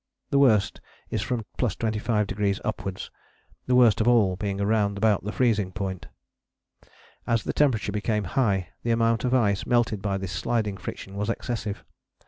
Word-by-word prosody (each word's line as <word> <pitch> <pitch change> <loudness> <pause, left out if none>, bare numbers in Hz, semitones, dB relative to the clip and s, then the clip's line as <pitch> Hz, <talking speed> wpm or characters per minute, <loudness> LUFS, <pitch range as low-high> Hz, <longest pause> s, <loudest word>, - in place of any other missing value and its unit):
The 140 - +4
worst 110 -8 +3 0.3
is - - -1
from 120 -3 -2
+25° 105 -3 0
upwards, 95 -3 -4 0.6
the 125 - +3
worst 120 -4 +5
of 110 - +1
all 110 -6 +4
being 100 +1 -3
round 100 0 +1
about 105 -1 +1
freezing 105 -6 +1
point. 95 -1 -5 1.2
As 115 -3 +1
the - - -3
temperature 125 -9 +1
became 105 +1 -1
high 100 -2 0
the 120 - -3
amount 115 0 +2
of 125 +1 +2
ice 100 -5 +1
melted 115 -4 +1
by 100 -1 -1
this 95 -1 -5
sliding 105 +1 -1
friction 95 - -7
was 105 +2 -2
excessive. 110 -3 -3
105 Hz, 150 wpm, -26 LUFS, 100-115 Hz, 1.2 s, worst